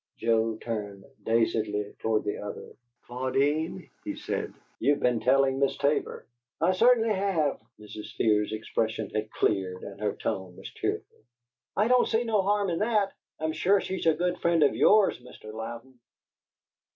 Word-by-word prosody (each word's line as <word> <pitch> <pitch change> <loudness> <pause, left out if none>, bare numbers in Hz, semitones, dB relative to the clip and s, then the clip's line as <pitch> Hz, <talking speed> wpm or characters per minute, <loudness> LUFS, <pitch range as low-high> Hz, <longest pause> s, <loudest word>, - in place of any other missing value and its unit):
Joe 115 -1 +1
turned 105 -4 -5 0.2
dazedly 110 -2 0
toward 110 -1 +1
the 105 - -3
other. 105 0 -7 0.3
"Claudine," 140 +8 -1
he - - -4
said, - - -3 0.3
"you've 145 0 +2
been 125 -2 +2
telling 135 +2 +3
Miss 140 -1 +1
Tabor." 145 +1 0 0.3
"I 170 +3 +3
cert'nly 225 +3 +4
have!" 190 -7 0 0.2
Mrs. 105 0 -9
Fear's 105 -1 +2
expression 110 0 -2
had 110 0 -2
cleared 95 -4 -1
and 100 0 -9
her 105 -1 0
tone 95 -2 -4
was - - -9
cheerful. - - -4 0.6
"I 210 +3 +3
don't 250 0 +4
see 225 +1 +1
no 220 -4 +2
harm 200 -1 +1
in 165 - -1
that! 210 -3 +1 0.3
I'm 160 0 -1
sure 195 +5 +3
she's 190 -2 -3
a 160 - +5
good 175 +2 -1
friend 170 -2 +3
of 145 - +3
YOURS, 210 -1 +4
Mr. 110 -3 -12
Louden." 115 +3 -8
130 Hz, 155 wpm, -28 LUFS, -, 0.6 s, a